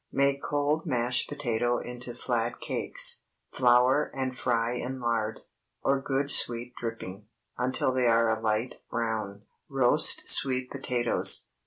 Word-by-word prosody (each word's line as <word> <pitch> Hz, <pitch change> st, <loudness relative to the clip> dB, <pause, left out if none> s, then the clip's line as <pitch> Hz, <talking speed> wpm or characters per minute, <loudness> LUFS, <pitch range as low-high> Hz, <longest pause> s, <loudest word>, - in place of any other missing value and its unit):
Make 140 Hz, 0 st, +1 dB
cold 145 Hz, +2 st, -1 dB
mashed 120 Hz, 0 st, 0 dB
potato 120 Hz, -4 st, -1 dB
into 120 Hz, 0 st, -8 dB
flat 120 Hz, -1 st, -3 dB
cakes; -, -, +1 dB, 0.3 s
flour 125 Hz, +3 st, +3 dB
and 130 Hz, -1 st, -3 dB
fry 120 Hz, -1 st, -1 dB
in 125 Hz, +2 st, -5 dB
lard, 115 Hz, -2 st, -2 dB, 0.4 s
or 135 Hz, 0 st, +1 dB
good 135 Hz, +1 st, -1 dB
sweet 120 Hz, +1 st, +2 dB
dripping, 105 Hz, -3 st, -7 dB, 0.3 s
until 130 Hz, +1 st, -1 dB
they 130 Hz, -1 st, +1 dB
are 115 Hz, -1 st, +2 dB
a 110 Hz, -, -11 dB
light 110 Hz, +2 st, -2 dB
brown. 110 Hz, -4 st, -4 dB, 0.3 s
ROAST 135 Hz, +2 st, +4 dB
SWEET 130 Hz, -2 st, +3 dB
POTATOES. 125 Hz, -3 st, +2 dB
125 Hz, 130 wpm, -27 LUFS, 115-130 Hz, 0.4 s, ROAST